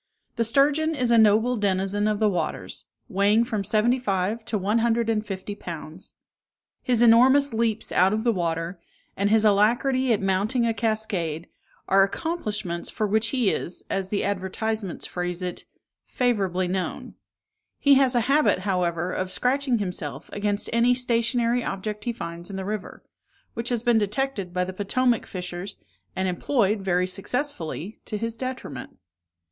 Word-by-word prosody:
The 235 - +1
sturgeon 290 +7 +2
is 250 -4 0
a 235 - +6
noble 220 +3 +4
denizen 200 0 0
of 210 -1 +1
the 215 0 +2
waters, 165 - -3 0.2
weighing 205 +4 +3
from 220 -4 -2
seventy 225 +6 +2
five 205 0 -1
to 220 - -1
one 205 +4 +1
hundred 230 0 +1
and 215 -1 0
fifty 195 -1 -5
pounds. 170 -2 -8 0.7
His 240 -2 +2
enormous 260 +4 +6
leaps 225 -1 -1
out 185 +2 +4
of 220 +1 -1
the 240 - +3
water, 170 -2 -2 0.4
and 200 +1 +1
his 220 0 +4
alacrity 240 +5 +3
at 215 - +3
mounting 200 +6 +1
a 230 - +1
cascade, 200 -8 -2 0.4
are 195 0 +5
accomplishments 210 - -2
for 215 - -2
which 220 +2 +2
he 245 -6 +1
is, 175 - -3
as 195 -1 -2
the 205 - -1
advertisements 200 0 -2
phrase 175 -1 -3
it, 180 -1 -5 0.4
"favourably 195 -8 0
known." 185 0 -3 0.6
He 280 - +5
has 265 -2 +4
a 240 - +4
habit, 275 -5 +3
however, 180 -2 -1
of 185 0 -2
scratching 255 +4 +1
himself 180 -8 -5
against 205 0 -1
any 235 +2 +4
stationary 240 0 +1
object 210 +2 -4
he 240 - 0
finds 170 -5 -7
in 200 - -6
the 190 0 -4
river, 210 0 -5 0.5
which 230 +1 -3
has 240 -2 -1
been 240 -2 +4
detected 210 -2 -2
by 180 0 0
the 185 +1 -5
Potomac 230 +5 +1
fishers, 180 +1 -5 0.4
and 190 0 0
employed, 210 +3 +1
very 180 -1 +1
successfully, 195 - -4
to 215 - -4
his 230 +1 -3
detriment. 250 - -6
210 Hz, 160 wpm, -25 LUFS, 185-235 Hz, 0.7 s, a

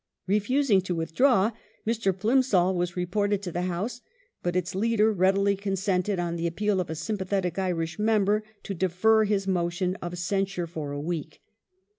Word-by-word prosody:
Refusing 210 +2 +2
to 180 -1 -3
withdraw, 200 +6 +3 0.3
Mr. 220 -3 +1
Plimsoll 200 -2 +2
was 175 0 -2
reported 200 +3 0
to 180 - -4
the 175 - -2
House, 205 +8 -3 0.4
but 175 0 -2
its 180 -1 -1
leader 220 +2 +2
readily 195 +1 +3
consented, 195 0 -1
on 170 -1 -2
the 170 0 -1
appeal 205 +3 0
of 175 - -6
a 160 - -3
sympathetic 190 0 -2
Irish 170 -2 -2
member, 210 -1 +2 0.2
to 200 - -4
defer 190 +5 +3
his 200 -2 0
motion 180 0 0
of 175 0 -5
censure 195 0 -1
for 160 -4 -6
a 145 - -4
week. 160 +1 -5
190 Hz, 160 wpm, -27 LUFS, 175-210 Hz, 0.4 s, withdraw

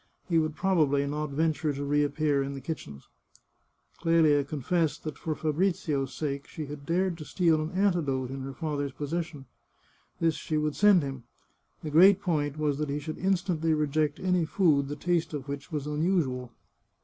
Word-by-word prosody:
He 165 -2 +3
would 155 -1 -1
probably 155 -7 +2
not 150 +1 -3
venture 155 +1 0
to 140 +1 -4
reappear 145 0 +1
in 140 0 -3
the - - -5
kitchens. 125 - -7 0.9
Clelia 160 -4 +4
confessed 155 +3 -1
that 155 - -4
for 155 -1 -2
Fabrizio's 155 -4 0
sake 140 +2 -4
she 155 - -6
had 145 0 -9
dared 175 0 0
to - - -6
steal 165 -1 +2
an 155 - -3
antidote 160 -10 +1
in 135 0 -5
her 135 +1 -6
father's 145 -2 -3
possession; 150 +1 -4 0.7
this 165 -1 +2
she 155 +1 -3
would 150 -1 0
send 205 -5 +5
him. 135 -3 -6 0.6
The 155 - -4
great 185 +5 +7
point 150 -6 -1
was 150 -2 0
that 150 -1 -2
he 140 - -1
should 155 +2 -6
instantly 175 -4 +1
reject 150 0 0
any 180 -2 +1
food 155 -5 +2
the 145 - -4
taste 165 0 -1
of 140 -1 -6
which 140 +2 -6
was 150 -3 -3
unusual. 150 -5 0
150 Hz, 175 wpm, -28 LUFS, 140-165 Hz, 0.9 s, great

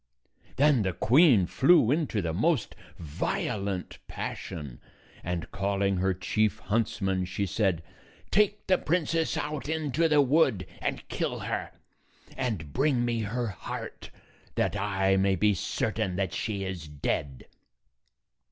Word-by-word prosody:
Then 145 -3 +4
the 95 -3 -1
queen 125 - +5
flew 135 - +4
into 145 - 0
the 80 -1 -2
most 140 - +1 0.2
violent 90 +4 -3
passion, 70 -7 -6 0.4
and, 90 -1 -4
calling 100 0 0
her 95 +1 +2
chief 95 +4 0
huntsman, 95 -3 -1
she 95 +2 -2
said, 95 -3 0 0.5
"Take 210 +1 +2
the 185 -1 +3
princess 165 0 0
out 150 -1 -3
into 160 0 +1
the 150 -2 +4
wood 135 - +3 0.2
and - - -3
kill - - -2
her, - - -3 0.7
and 110 - -3
bring 130 -3 +2
me 120 -1 0
her 115 +2 -2
heart, 95 - -7 0.5
that - - 0
I 95 -1 +1
may 95 0 +3
be 105 +3 +3
cer 90 - -1
tain 90 -1 -2
that 95 -3 -1
she 105 -3 -2
is 90 -4 -5
dead." 70 -2 -3
105 Hz, 135 wpm, -28 LUFS, 95-140 Hz, 0.7 s, queen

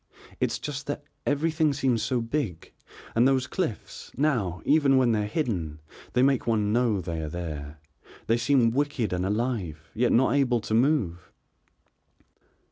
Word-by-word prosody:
"It's - - 0
just 150 0 -6
that 145 +1 -4 0.2
everything 155 +1 +1
seems 130 -5 +1
so 120 +2 0
big 115 - -3 0.4
and 120 +3 +4
those 130 -1 +2
cliffs, 130 - -4
now, 115 - 0
even 140 -3 +4
when 125 -2 +4
they 105 -2 +1
are - - -4
hidden, 95 - -2 0.3
they 125 - +3
make 135 -3 +2
one 105 -2 +1
know 115 -5 +2
they 85 -2 -4
are 80 - -4
there, 75 -3 -6 0.5
they 115 - +2
seem 120 -1 +3
wicked 140 -5 -1
and 90 +1 -1
alive, 100 -9 -2
yet 120 +2 +1
not 130 +3 +4
able 130 -4 +2
to 110 - -4
move." 110 - +1
120 Hz, 155 wpm, -26 LUFS, 95-140 Hz, 0.5 s, and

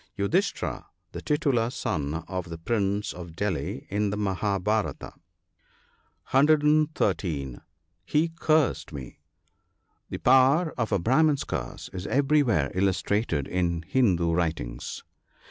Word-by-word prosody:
— - - -45
Yudhisthira, 100 0 -1 0.4
titular 140 -6 +1
son 75 - -3
of 90 -2 -4
the 85 - -6
Prince 100 +2 -1
of 85 -2 -9
Delhi, 100 - -3
in 105 0 0
the 105 - -3
Mahabharata. 100 +1 -1 1.2
(113.) 135 - +2 0.4
He 155 +2 +1
cursed 160 - +1
me. 65 -5 -9 0.5
— - - -47
The - - -4
power 135 +6 +4
of 115 -3 -2
a - - +3
Brahman's 140 - +2
curse - - -5
is 95 +1 -5
everywhere 135 - +2
illustrated 95 - 0
in 85 -2 -1
Hindoo 85 -6 +2
writings. 80 -8 -3
100 Hz, 110 wpm, -26 LUFS, 85-135 Hz, 1.2 s, power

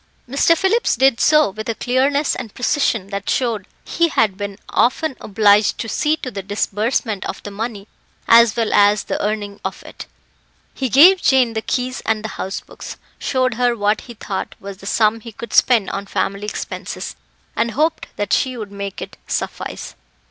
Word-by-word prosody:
Mr. 280 +6 +3
Phillips 385 +7 +2
did 260 -1 +3
so 305 -7 +4
with 215 +3 -6
a 230 - -1
clearness 275 +5 +1
and 230 -5 -7
precision 240 -6 0
that 200 0 -4
showed 230 -7 0 0.2
he 335 0 +1
had 220 - +1
been 200 0 -5
often 270 +4 +1
obliged 205 0 +3
to 225 - -4
see 300 +7 +1
to 255 - -6
the 195 - -5
disbursement 210 +1 -1
of - - -6
the 205 - -7
money 210 -1 -5 0.4
as 230 -1 +6
well 230 -2 0
as 205 0 +4
the - - -3
earning 205 -1 -3
if - - -5
it. - - -10 0.7
He 265 -2 -2
gave 350 - +7
Jane 255 -4 +3
the 220 - -2
keys 255 +2 -2
and 220 -1 0
the 220 - -4
house 190 +1 -4
books, - - -10 0.2
showed 255 -2 0
her 245 0 +1
what 210 +1 +1
he 240 - -11
thought 200 -2 -5
was 195 -1 -8
the 195 - -11
sum 215 +1 +2
he 230 +1 -10
could 230 +1 -9
spend 230 -6 +4
on 200 0 -5
family 200 +1 -2
expenses, - - -5 0.4
and 235 - +1
hoped 310 +7 0
that 205 - -2
she 255 -2 +1
would 210 -3 -7
make 200 -1 -5
it - - -11
suffice. - - -4
225 Hz, 185 wpm, -19 LUFS, 205-255 Hz, 0.7 s, gave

